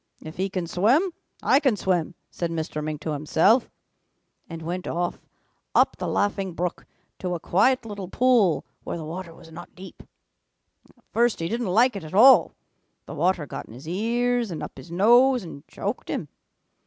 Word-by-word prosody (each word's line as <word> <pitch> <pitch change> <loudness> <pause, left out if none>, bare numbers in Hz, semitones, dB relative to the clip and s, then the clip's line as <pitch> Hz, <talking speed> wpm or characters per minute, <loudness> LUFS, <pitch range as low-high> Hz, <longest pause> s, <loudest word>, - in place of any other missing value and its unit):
'If 155 +1 -10
he 190 +2 -1
can 185 -2 -3
swim, 250 - +2 0.3
I 270 - +5
can 265 -7 +2
swim,' 180 -3 -1 0.2
said 170 - -3
Mr. 160 -2 -4
Mink 150 -1 -4
to 155 - -3
himself, 160 - +2 0.8
and 165 -1 -7
went 180 +2 -4
off 175 +1 -2 0.6
up - - +4
the - - -4
Laughing 195 -2 -1
Brook 175 0 -3 0.3
to 180 -1 -2
a - - -5
quiet 225 +10 +2
little 205 -4 -6
pool 230 -5 +2 0.2
where - - -4
the 160 - -6
water 170 +2 -6
was 165 0 -15
not 175 +2 -11
deep. 185 -1 -12 1.0
"At - - -29
first 235 +1 +2
he 165 - -2
didn't 230 +4 -2
like 230 +6 +3
it 200 - -5
at 155 +3 -8
all. 255 +6 +7 0.5
The - - -8
water 170 0 +1
got 130 - -7
in 110 - -12
his 135 +5 -12
ears 235 +5 0
and 165 - -5
up - - -7
his - - -12
nose 240 +7 +4
and 150 -5 -10
choked - - -5
him. - - -3
185 Hz, 180 wpm, -25 LUFS, 165-230 Hz, 1.0 s, all